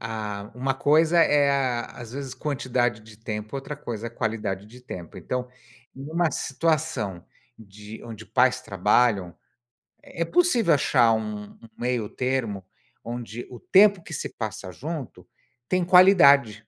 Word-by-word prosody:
a 105 -2 -5
uma 135 +2 -1
coisa 160 +5 +3
é 145 -3 +4
a 130 -4 0
às 120 -1 -11
vezes 135 -2 -6
quantidade 125 -6 -1
de 110 -1 -15
tempo, 110 +1 -6
outra 140 +2 -6
coisa 115 -5 -6
é - - -6
qualidade 105 -4 -3
de 125 +3 -15
tempo. 90 -8 -9
Então, 125 0 -4 0.5
numa 155 +4 -1
situação 135 - -1 0.3
de 105 +1 -12
onde 110 -1 -9
pais 130 0 +2
trabalham, 100 -2 +1 0.7
é 170 - -4
possível 245 - +3
achar 125 -5 +3
um 105 -1 -4
um - - -12
meio 120 -3 -2
termo, 120 -7 -2 0.4
onde 120 0 -6
o 125 - -10
tempo 200 -1 +5
que 160 - -10
se - - -4
passa 105 -4 -6
junto, 150 - -7 0.4
tem 185 -1 +2
qualidade. 145 - +6
125 Hz, 140 wpm, -25 LUFS, 110-145 Hz, 0.7 s, qualidade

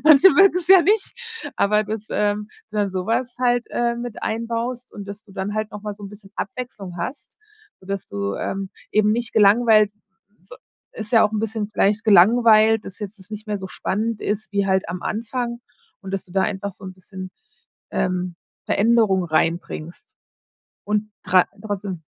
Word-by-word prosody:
Manche 310 +4 +8
mögen‘s 365 -3 +4
ja 380 -2 +9
nicht. 410 +3 +2 0.4
Aber 210 +1 +3
das, 215 0 -5
ähm 210 0 0 0.2
dann 205 -1 0
sowas 230 +7 -1
halt, 245 -1 +2
äh, 235 0 0
mit 240 -2 -6
einbaust 230 +2 -3
und 205 -2 -8
dass 205 +1 -8
du 200 - -17
dann 195 +2 -3
halt 215 0 -2
nochmal 210 0 -5
so 205 0 -11
‘n - - -7
bisschen 200 -1 -14
Abwechslung 235 -8 -6
hast, 250 +12 -6 0.4
so 185 - -17
dass 195 -1 -4
du, 100 0 -3
ähm, 195 -1 -3 0.2
eben 210 0 +4
nicht 235 0 -2
gelangweilt 215 0 +5 0.5
so - - -14 0.4
ist 220 +2 -8
ja 225 - +7
auch 210 - 0
‘n 215 - -1
bisschen 220 -1 -2
vielleicht 210 0 +1
gelangweilt, 220 +2 +6
dass 195 - -9
jetzt 205 0 -7
das 190 +3 -17
nicht 215 +1 -7
mehr 210 -1 -2
so 190 -1 -7
spannend 215 +4 -2
ist 210 +1 -2
wie 200 -1 +1
halt 190 -2 +1
am 175 0 -5
Anfang 235 +2 -3 0.4
und 195 0 -7
dass 195 - -3
du 180 - -17
da 190 0 +2
einfach 200 -1 -2
so 190 - -15
‘n 185 - -7
bisschen, 185 0 -9 0.6
ähm, 180 -1 -1 0.3
Veränderung 215 -3 +3
reinbringst 165 - -2 0.7
und 210 +1 -1
tra 185 -1 +4 0.2
trotzdem 200 -5 -5
210 Hz, 175 wpm, -22 LUFS, 195-230 Hz, 0.7 s, ja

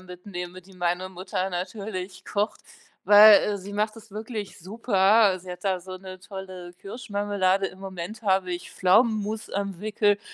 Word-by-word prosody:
mitnehme, 180 0 -8
die 190 +1 -18
meine 180 +1 -1
Mutter 185 +1 -3
natürlich 185 0 -5
kocht, 205 +1 -1 0.4
weil, 210 +1 +9
äh, 205 -1 -1
sie 195 +2 -9
macht 215 +2 -1
es 220 -2 -14
wirklich 215 -3 -6
super. 200 0 +3
Sie 185 - -10
hat 180 +2 -9
da 190 -2 +1
so 185 +1 -8
'ne 185 0 -10
tolle 185 -2 -9
Kirschmarmelade. 200 -3 0
Im 190 - -11
Moment 195 +3 -7
habe 190 -3 +1
ich 175 0 -6
Pflaumenmus 215 +2 +2
am 200 -2 -3
Wickel 210 -1 +2
195 Hz, 155 wpm, -26 LUFS, 185-210 Hz, 0.4 s, weil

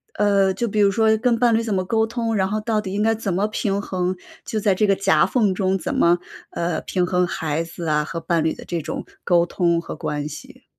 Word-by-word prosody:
呃， 200 -2 +3
就 240 - -2
比 210 0 -1
如 200 - +5
说 220 +1 +3
跟 235 0 +1
伴 240 -1 +4
侣 230 - +2
怎 220 -3 -2
么 185 - 0
沟 220 +3 +1
通， 230 0 -2
然 190 -2 +1
后 215 - -1
到 220 -1 0
底 190 - -6
应 210 - 0
该 225 +1 +3
怎 210 -4 -3
么 195 +4 +1
平 200 -1 -1
衡， 185 -1 -2 0.3
就 220 - -2
在 200 -2 +3
这 210 +3 +1
个 195 - +4
夹 195 - +3
缝 215 -6 +1
中 190 0 0
怎 170 - -4
么， 175 +1 +3 0.3
呃， 170 -2 -2
平 180 -2 -1
衡 180 0 +1
孩 160 -1 -2
子 170 +1 -8
啊 150 0 +2
和 165 0 -5
伴 165 0 +1
侣 160 - +1
的 - - -11
这 170 -2 -3
种 - - -5 0.2
沟 175 -2 +4
通 170 -1 +1
和 - - -7
关 150 0 -3
系？ 145 -1 -11
190 Hz, 265 characters per minute, -22 LUFS, 170-215 Hz, 0.3 s, 如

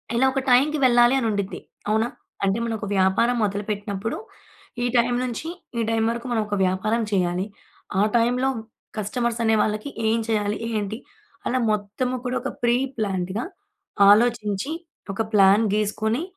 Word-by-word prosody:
ఇలా 250 +3 +4
ఒక 270 - 0
టైమ్‌కి 285 +5 +4
వెళ్ళాలి 240 +1 +5
అని 235 - 0
ఉండిద్ది. 200 -2 -3 0.3
అవునా? 220 +2 +2 0.4
అంటే 195 +2 +1
మనం 230 -1 -2
ఒక 205 - -5
వ్యాపారం 190 +6 +3
మొదలు 200 0 -2
పెట్టినప్పుడు, 205 +1 -3 0.7
ఈ - - +1
టైమ్ 245 +1 +2
నుంచి 250 +5 -4 0.3
ఈ - - +2
టైమ్ 225 0 +1
వరకు 235 +2 -5
మనం 230 -2 +2
ఒక 205 - -1
వ్యాపారం 215 +5 0
చేయాలి. 180 -1 +1 0.6
ఆ - - +5
టైమ్‌‌లో 245 +3 +2 0.5
కస్టమర్స్ 235 +3 -1
అనే 220 0 +4
వాళ్ళకి 215 +5 -2 0.2
ఏం 225 +1 +2
చేయాలి, 210 -1 0
ఏంటి, 215 0 -2 0.5
అలా 255 - +1
మొత్తం 210 +4 -1 0.2
కూడా 250 +1 -1
ఒక - - -3
ప్రీ 240 0 +4 0.2
ప్లాన్డ్‌గా 195 0 -2 0.6
ఆలోచించి, 215 +2 +3 0.4
ఒక 195 - -2
ప్లాన్ 200 +1 +6
గీసుకొని, 215 +5 0
220 Hz, 150 wpm, -24 LUFS, 205-240 Hz, 0.7 s, ప్లాన్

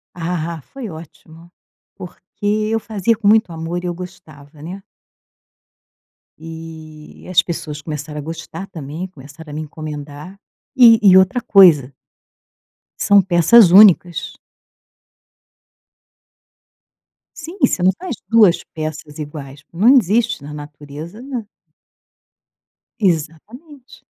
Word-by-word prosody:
Ah, 170 -2 -4
foi 265 -5 -7
ótimo. 165 +1 -14 0.4
Porque 180 +1 -13 0.4
eu 225 - 0
fazia 220 +1 -1
com 210 -1 -3
muito 215 -3 +3
amor 165 +2 -5
e - - -3
eu 175 - -3
gostava, 155 -5 -13
né. 180 +5 -8 1.6
E 160 -1 -12
as 180 -1 +4
pessoas 155 -4 -6
começaram 150 0 -7
a - - -5
gostar 165 +3 -8
também, 160 0 -7
começaram 150 -1 -14
a - - -9
me 155 - -5
encomendar 155 +3 -9 0.4
e 235 -4 +7
e 190 -3 +6
outra 190 +6 +2
coisa 170 - +5 1.1
são 200 0 +4
peças 180 +3 +5
únicas. 180 -4 +4 3.0
Sim, 330 +4 -10
você 260 -8 +2
não 185 - +5
faz 365 -8 -5
2 210 -5 +4
peças 155 -2 -7
iguais. 145 -2 -9
Não 190 +7 +1
existe 220 - 0
na 150 +1 -9
natureza, 150 +6 -10
né. 255 -4 -6 1.5
Exatamente. 220 - -4
170 Hz, 110 wpm, -18 LUFS, 155-200 Hz, 3.0 s, e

